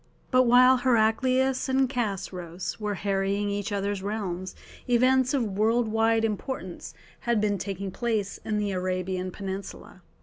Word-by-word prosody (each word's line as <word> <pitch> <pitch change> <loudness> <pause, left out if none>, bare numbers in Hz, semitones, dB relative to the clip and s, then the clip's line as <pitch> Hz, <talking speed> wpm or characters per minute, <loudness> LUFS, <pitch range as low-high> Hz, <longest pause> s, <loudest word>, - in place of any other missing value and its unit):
But 255 -1 +4
while 255 +2 +7
Heraclius 255 +2 +2
and 265 0 +3
Chosroës 190 -8 -4
were 210 -1 -2
harrying 200 +1 -1
each 205 +1 -3
other's 200 -1 -2
realms 190 -3 -4 0.3
events 255 +1 +4
of 265 - +1
world 220 +3 +1
wide 225 +1 +2
importance 185 -7 -5 0.2
had 235 -2 +1
been 205 -2 0
taking 195 0 -4
place 220 -3 -2
in 215 -1 -1
the 205 -1 -1
Arabian 185 0 -2
peninsula. 195 +1 -7
210 Hz, 135 wpm, -27 LUFS, 195-240 Hz, 0.3 s, while